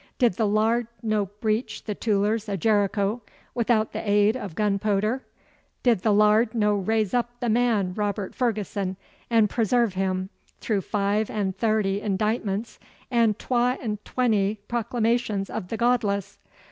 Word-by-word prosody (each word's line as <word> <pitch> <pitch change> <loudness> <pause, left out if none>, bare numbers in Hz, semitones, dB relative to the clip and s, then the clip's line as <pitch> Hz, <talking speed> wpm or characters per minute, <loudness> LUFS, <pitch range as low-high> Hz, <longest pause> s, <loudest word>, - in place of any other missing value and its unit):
'Did 240 -6 +3
the 215 +3 0
Lard 220 +3 +2 0.2
no 215 -2 0
breach 215 +4 -2
the 210 - -3
too'ers 210 +1 0
o' 200 - -1
Jericho 205 +2 +1 0.3
withoot 230 -2 +1
the - - -4
aid 205 +1 +3
o' 245 -5 -4
gunpooder? 210 +5 0 0.6
Did 240 -5 +4
the 215 +4 +1
Lard 215 +2 +4
no 210 -2 +2
raise 210 0 0
up 240 0 -1
the 240 -2 -1
man 220 -5 +2
Robert 205 -1 -2
Ferguson 205 -5 -2 0.3
and 225 -3 +4
presairve 230 0 +1
him 185 0 -2 0.3
through 210 -4 -1
five 205 +2 0
and 195 -3 -2
thairty 210 -2 +1
indictments 210 +1 -2 0.3
and 230 -3 +3
twa 250 0 +1
and 210 -3 -4
twenty 215 -5 +1
proclamations 230 -3 -1
o' - - -2
the 210 +3 -6
godless? 225 -5 0
215 Hz, 145 wpm, -25 LUFS, 200-230 Hz, 0.6 s, Did